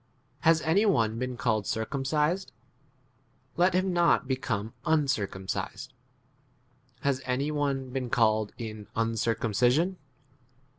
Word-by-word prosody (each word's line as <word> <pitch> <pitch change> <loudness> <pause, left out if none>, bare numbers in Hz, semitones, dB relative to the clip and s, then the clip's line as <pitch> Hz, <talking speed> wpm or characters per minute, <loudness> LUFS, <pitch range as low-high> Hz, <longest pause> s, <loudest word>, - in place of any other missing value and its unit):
Has 160 0 +4
any 175 +7 +3
one 115 - +2
been 125 -1 -3
called 110 -5 0
circumcised? 150 - -1 1.0
let 180 +1 +3
him 185 0 +1
not 170 -5 +3
become 115 -5 -2
uncircumcised: 135 -3 -1 1.1
has 135 -2 0
any 130 +4 -1
one 140 -3 -1
been 130 -2 -3
called 110 -3 +2
in 110 -3 -7
un 115 0 0
circumcision 120 - +1
130 Hz, 105 wpm, -28 LUFS, 115-155 Hz, 1.1 s, Has